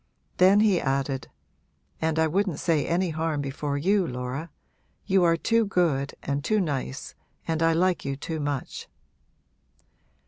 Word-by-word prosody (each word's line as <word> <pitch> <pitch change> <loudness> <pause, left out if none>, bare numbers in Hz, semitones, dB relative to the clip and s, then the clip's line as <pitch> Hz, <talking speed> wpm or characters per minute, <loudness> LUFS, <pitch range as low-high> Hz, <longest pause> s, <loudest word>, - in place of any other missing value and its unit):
Then 190 +3 +6
he 205 -5 +3
added, 135 -2 -1 0.7
'And 160 0 0
I 160 - +4
wouldn't 180 0 0
say 160 -4 +1
any 175 +1 +1
harm 160 -1 -1
before 140 +1 -3
you, 190 +4 +2
Laura. 125 +6 -4 0.6
You 190 -2 +3
are 165 -1 +4
too 230 +6 +2
good 165 -9 0
and 140 0 -2
too 215 +5 +2
nice 140 - -3 0.3
and 160 -1 -1
I 165 0 +4
like 180 +1 +1
you 140 0 -2
too 160 +3 -5
much!' 145 -2 -4
160 Hz, 145 wpm, -26 LUFS, 140-180 Hz, 0.7 s, Then